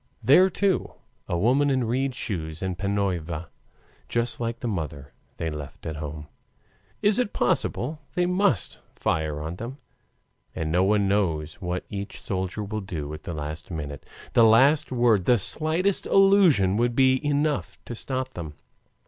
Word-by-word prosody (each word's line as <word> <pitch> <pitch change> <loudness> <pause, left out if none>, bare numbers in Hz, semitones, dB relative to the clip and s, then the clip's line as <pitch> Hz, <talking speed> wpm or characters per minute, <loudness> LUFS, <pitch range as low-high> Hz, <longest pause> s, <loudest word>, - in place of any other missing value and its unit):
There, 160 - +6
too, 195 0 0 0.3
a 85 - -1
woman 130 +9 +3
in 130 -2 +1
reed 130 +3 -1
shoes 80 -7 -4
and 95 -1 -2
PANYOVA, 90 -4 -2 0.6
just 120 0 0
like 115 0 -3
the 120 - -2
mother 75 -8 -4 0.3
left 75 -4 -5
at 80 -1 -4
home. 75 0 -6 0.8
Is 205 +3 +4
it 245 -5 0
possible 130 +4 0 0.2
they 180 - +2
must 180 - +1 0.2
fire 80 -2 -1
on 80 +3 -5
them? 120 +6 -6 0.8
And 80 -1 -2
no 90 +3 +3
one 100 0 +3
knows 85 -5 0
what 90 0 -3
each 100 0 -6
soldier 95 +2 -3
will 105 +1 -4
do 80 -6 -5
at 75 - -8
the 85 - -4
last 75 +2 -6
minute. 75 -5 -6 0.3
The 115 - +6
least 135 +8 +5
word, 120 -7 +3
the 120 - +5
slightest 160 - +1
allusion 185 - +5
would 120 0 +1
be 130 0 +4
enough 145 0 0
to - - -6
stop 130 +2 -3
them. 80 - -7
105 Hz, 155 wpm, -25 LUFS, 80-130 Hz, 0.8 s, There